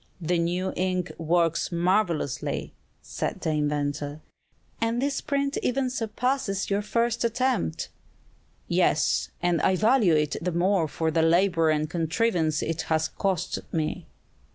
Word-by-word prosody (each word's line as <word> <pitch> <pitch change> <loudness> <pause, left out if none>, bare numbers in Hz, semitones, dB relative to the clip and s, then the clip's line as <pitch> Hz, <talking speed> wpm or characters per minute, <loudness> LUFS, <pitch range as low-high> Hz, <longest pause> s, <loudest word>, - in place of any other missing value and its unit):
"The 175 0 0
new 175 +3 -1
ink 185 -1 -1
works 165 +1 +1
marvelously!" 170 -6 0 0.3
said - - -4
the 160 - 0
inventor. 145 0 -1 0.6
"And 230 +1 +1
this 275 +1 -1
print 280 0 -1
even 255 0 0
surpasses 235 -3 -1
your 200 +1 +2
first 235 +3 0
attempt!" 235 - 0 0.8
"Yes, 60 +2 +2
and 175 -2 +2
I 190 - +3
value 215 -3 +4
it 150 -1 +1
the 180 +2 -1
more 175 0 +2
for 160 +2 -1
the 165 +1 +2
labor 165 0 +3
and 155 0 +1
contrivance 165 -1 0
it 165 0 -2
has 160 0 +1
cost 185 -3 -1
me." 160 +1 -2
175 Hz, 130 wpm, -26 LUFS, 160-215 Hz, 0.8 s, value